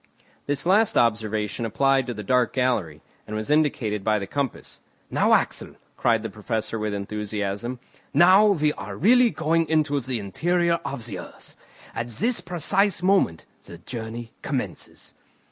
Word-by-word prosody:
This 145 0 -1
last 205 +4 +3
observation 110 -1 0
applied 135 +3 +1
to 120 - -3
the 105 - -6
dark 125 +4 +2
gallery, 110 - -1 0.2
and 110 - -5
was 110 +5 -3
indicated 130 -9 +1
by 110 +1 +2
the 100 - -3
compass. 140 +5 -4 0.3
"Now, - - +3
Axel," - - 0 0.2
cried 115 -2 +1
the 110 - -4
Professor 110 +1 -3
with 105 0 -2
enthusiasm, 105 +3 -3 0.3
"now 185 +7 +6
we 155 -7 +2
are 100 0 -8
really 245 - +5
going 165 -3 0
into 155 -2 +2
the 130 -1 -3
interior 170 - 0
of 140 -4 -3
the 100 -6 -5
earth. - - -10 0.4
At 115 +1 -3
this 225 - -1
precise 180 +2 0
moment 185 - +2 0.2
the 85 - -9
journey 115 +4 -7
commences." - - -5
125 Hz, 150 wpm, -24 LUFS, 105-160 Hz, 0.4 s, now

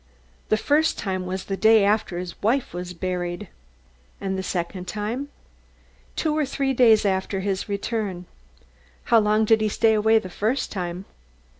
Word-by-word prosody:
"The 215 - +3
first 300 +7 +2
time 185 -2 -3
was 185 +1 -4
the 195 - -2
day 220 0 +5
after 205 -3 +1
his 180 -1 -5
wife 240 +2 +1
was 180 0 -5
buried." 180 +1 -3 0.7
"And 190 -1 -2
the 190 - -2
second 180 0 -4
time?" 220 +9 -3 0.9
"Two 310 -2 0
or 310 - +2
three 275 -1 -1
days 225 -4 +5
after 190 0 0
his 195 +1 -2
return." 200 -3 -3 0.9
"How 230 - +8
long 215 +1 +2
did 220 0 +4
he 215 - +1
stay 220 +2 +3
away 220 +1 +4
the 220 - -2
first 220 +8 -1
time?" 180 -1 -4
205 Hz, 160 wpm, -24 LUFS, 185-225 Hz, 0.9 s, How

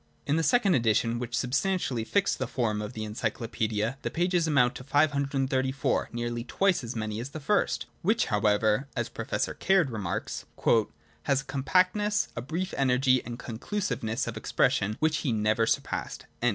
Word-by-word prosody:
In 145 - +1
the 165 - +2
second 210 0 +3
edition, 115 -2 +2
which 120 0 -3
substantially 130 - 0
fixed 200 - +1
the 130 - -1
form 115 -4 -1
of 105 +3 -6
the 110 - -4
Encyclopaedia, 110 +1 -2
the - - -2
pages 175 -1 +1
amount 125 -5 +3
to - - -8
xlii, 145 +3 +4
534— 135 -1 0
nearly 120 0 -3
twice 190 +5 +1
as 115 +1 -5
many 110 -1 -3
as 125 +3 -5
the 155 - -7
first, 200 +8 +1 0.2
which, 215 +6 +2
however, 105 +3 +2
as - - -2
Professor - - -2
Caird 185 -7 +2
remarks, 105 -6 -4 0.8
'has 135 -1 +2
a - - -17
compactness, 185 +10 +1
a - - -3
brief 170 +9 -3
energy 130 -1 +3
and 120 0 -6
conclusiveness 125 - -3
of 115 -1 -5
expression, 110 -2 +1
which 155 -1 +2
he 135 - -1
never 110 +1 +2
surpassed.' - - -2
130 Hz, 165 wpm, -28 LUFS, 115-155 Hz, 0.8 s, xlii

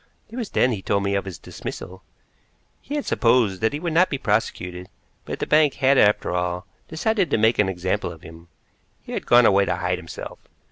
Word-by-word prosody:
It - - -9
was 240 -5 -4
then 125 - +2
he 105 -5 -3
told 100 +1 0
me 100 0 0
of 100 0 -1
his 95 -3 -7
dismissal. 95 +1 -8 0.8
He 285 - -6
had 295 - -2
supposed 115 -6 +2
that 110 - +2
he 145 - -4
would 170 -1 -3
not 180 +3 +4
be 140 - -2
prosecuted, 90 -6 -2 0.4
but - - -5
the - - -3
bank 150 -3 +3
had, 135 +1 +3
after 105 0 +3
all, 90 +1 -2 0.2
decided 195 +3 0
to - - +2
make 110 +2 +2
an 100 -2 +3
example 95 +1 -2
of 80 -2 -13
him. 80 +1 -13 0.6
He - - -10
had - - -4
gone 120 0 +6
away 100 -1 +4
to - - -1
hide 90 -1 -2
himself. 85 -2 -9
105 Hz, 215 wpm, -23 LUFS, 90-140 Hz, 0.8 s, gone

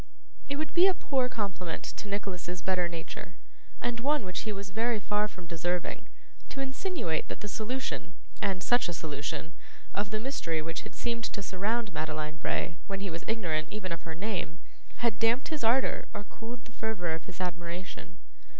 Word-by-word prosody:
It 280 - +1
would 310 +2 -1
be 355 +2 +9
a 380 - +5
poor 260 -5 +2
compliment 190 -7 -1
to 205 - -4
Nicholas's 185 -3 -2
better 180 -2 +3
nature, 170 +1 -5 0.4
and 240 -1 0
one 285 -1 +3
which 185 - -1
he - - +2
was 200 -1 -4
very 225 +2 +3
far 210 +1 +2
from 185 -4 -10
deserving, 170 +1 0 0.4
to - - -4
insinuate 270 - 0
that - - -4
the 210 - -2
solution, 215 -5 -1 0.3
and 190 -2 +2
such 245 -6 +5
a - - 0
solution, 150 +1 -2 0.4
of 205 0 +1
the 215 0 0
mystery 215 - 0
which 165 +1 -2
had - - -9
seemed 235 -1 0
to 200 - -2
surround 205 +3 +1
Madeline 155 -1 -1
Bray, 160 +1 0
when 195 -1 -1
he 195 -2 -1
was 165 +1 -3
ignorant 170 -9 +1
even 195 -4 -3
of 170 - -1
her 160 -1 -4
name, 180 -4 -1 0.5
had 225 -3 +3
damped 230 +3 +4
his 310 -5 -1
ardour 240 +4 +4
or 205 - -2
cooled 225 +3 -7
the 230 - -12
fervour 215 -8 0
of 160 - -3
his 185 0 -8
admiration. 175 - -3
195 Hz, 185 wpm, -32 LUFS, 170-230 Hz, 0.5 s, be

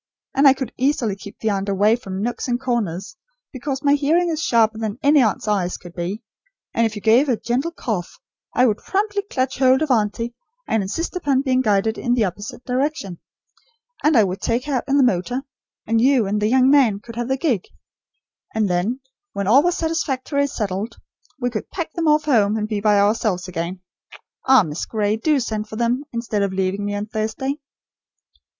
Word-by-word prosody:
And 280 +1 +5
I 270 - +8
could 265 -3 -5
easily 250 -6 +1
keep 200 +1 -11
the 220 - -1
aunt 195 0 -2
away 205 +3 +3
from 195 -4 -5
nooks 240 +3 -3
and 245 -1 0
corners, 235 - -2 0.4
because 265 +1 -4
my 285 0 +4
hearing 315 +5 +2
is 320 -1 -2
sharper 225 -4 +2
than 220 -1 -3
any 285 0 +5
aunt's 220 -2 0
eyes 190 -4 0
could 175 -1 -13
be, 185 +6 -4 0.5
and 230 0 +3
if 220 - -7
you 210 - -7
gave 240 +6 +4
a 240 - +2
gentle 250 +9 -1
cough, 220 - -4 0.4
I 250 - +5
would 215 -4 +2
promptly 405 +1 -1
clutch 265 -11 -2
hold 260 +2 +4
of 305 - -1
auntie, 230 +1 0 0.3
and 220 - +1
insist 270 - -3
upon 280 -6 +1
being 260 -2 +2
guided 215 -1 +1
in 245 -1 +1
the 230 -4 +2
opposite 205 +6 -6
direction. 250 - -2 0.8
And 300 -3 +4
I 220 - +7
would 185 0 -3
take 235 +2 0
her 290 - -3
out 255 - 0
in 275 - +2
the 280 - +5
motor; 245 +4 0 0.4
and 225 +1 +2
you 255 -3 +4
and 210 +2 -1
the 210 - +2
young 260 +1 +4
man 250 -9 +4
could 230 +2 -11
have 240 0 -3
the 265 0 0
gig. 255 - 0 0.9
And 220 -2 +2
then 190 +9 -1 0.3
when 200 - -2
all 240 +8 +6
was 350 +2 +1
satisfactorily 285 -4 -1
settled, 210 -2 -3 0.4
we 245 -1 -1
could 215 - -5
pack 340 -3 -5
them 335 -2 -1
off 300 0 +4
home, 220 -7 +3
and 210 -1 -2
be 210 -2 -2
by 210 -1 +4
ourselves 200 -3 +1
again. 175 +1 -4 0.7
Ah, 265 -4 +7
Miss 155 -1 -4
Gray, 210 -1 0
do 290 +6 +1
send 215 -3 -3
for - - -7
them, 240 +5 0
instead 230 -3 -2
of 200 -1 0
leaving 190 +1 -1
me 205 0 -2
on 205 +1 -3
Thursday." 220 +6 -3
230 Hz, 200 wpm, -21 LUFS, 205-270 Hz, 0.9 s, I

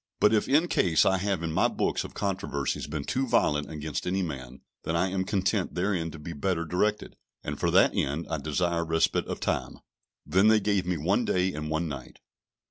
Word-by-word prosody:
But - - +5
if 110 - +1
in 155 +5 +4
case 85 - +3
I 95 -1 +3
have 95 -3 -1
in 80 - -2
my - - +3
books - - -1
of - - -10
controversies 95 -11 -2
been 75 -1 -4
too 130 - -1
violent 75 -11 +2
against 75 0 -4
any 95 +1 0
man, 65 -5 -7 0.2
then 80 - -2
I 95 +3 +2
am 95 0 -1
content 95 0 0
therein 90 -2 0
to 80 - -9
be 80 +3 -7
better 85 +2 -1
directed, 105 +6 -1 0.3
and - - -4
for - - +1
that - - +5
end 75 +5 -1
I 80 - -2
desire 85 +4 0
respite 80 0 +1
of - - -4
time." - - -2 0.5
Then 95 +8 +3
they 110 0 +6
gave 100 -3 0
me 90 -2 0
one 95 +10 +1
day 95 -3 +1
and 75 0 -5
one 80 +2 -1
night. 70 -5 -8
85 Hz, 210 wpm, -27 LUFS, 80-95 Hz, 0.5 s, they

